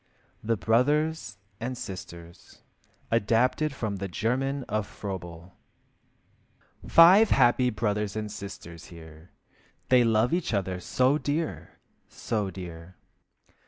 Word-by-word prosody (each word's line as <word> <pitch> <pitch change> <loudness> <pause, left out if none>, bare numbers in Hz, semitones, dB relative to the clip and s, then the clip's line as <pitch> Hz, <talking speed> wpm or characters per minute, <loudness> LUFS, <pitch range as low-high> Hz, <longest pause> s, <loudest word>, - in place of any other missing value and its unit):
THE 115 +1 0
BROTHERS 125 - +1 0.2
AND 125 +2 -4
SISTERS 85 -4 -10 0.5
(Adapted 115 +7 +2
from 110 -7 -4
the 100 +1 -4
German 130 +8 -1
of 110 -4 -3
Froebel) 85 -3 -8 1.3
Five 190 +6 +7
happy 125 0 +4
brothers 105 -2 -2
and 105 -1 -4
sisters 95 -5 -9
here, 80 0 -14 0.6
They 125 -1 +6
love 115 +3 +2
each 170 -10 0
other 95 -2 -2
so 130 - +1
dear, 155 +3 -3 0.3
so 105 -3 -3
dear! 90 -1 -9
110 Hz, 105 wpm, -27 LUFS, 95-130 Hz, 1.3 s, Five